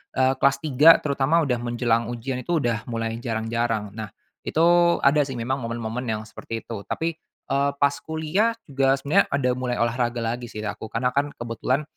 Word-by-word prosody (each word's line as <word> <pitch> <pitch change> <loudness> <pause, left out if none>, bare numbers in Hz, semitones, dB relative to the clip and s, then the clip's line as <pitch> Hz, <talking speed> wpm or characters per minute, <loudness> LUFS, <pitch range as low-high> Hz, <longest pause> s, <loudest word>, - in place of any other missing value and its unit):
eee, 130 0 +3
kelas 140 0 +4
tiga 150 +1 +5
terutama 145 +3 +2
udah 125 -5 0
menjelang 120 -1 0
ujian 125 +2 -4
itu 175 +5 0
udah 115 -2 -1
mulai 115 -1 -3
jarang-jarang. 115 -2 -2
Nah, 110 -1 -6 0.4
itu 170 +1 +4
ada 145 +2 +5
sih 135 - -5
memang 120 +3 -2
momen-momen 115 +1 -4
yang 110 -1 -1
seperti 110 +1 -7
itu. 115 - -6
Tapi, 165 +1 -1 0.4
eee, 140 +1 +2
pas 140 0 +2
kuliah, 160 +9 0
juga 135 -3 +2
sebenarnya 140 +2 +2
ada 135 -3 0
mulai 125 -1 -1
olahraga 120 0 0
lagi 120 +1 -3
sih 110 -1 -7
aku, 110 +1 -5
karena 125 +3 -1
kan 140 +2 -1
kebetulan 120 +5 -2
125 Hz, 175 wpm, -24 LUFS, 115-140 Hz, 0.4 s, tiga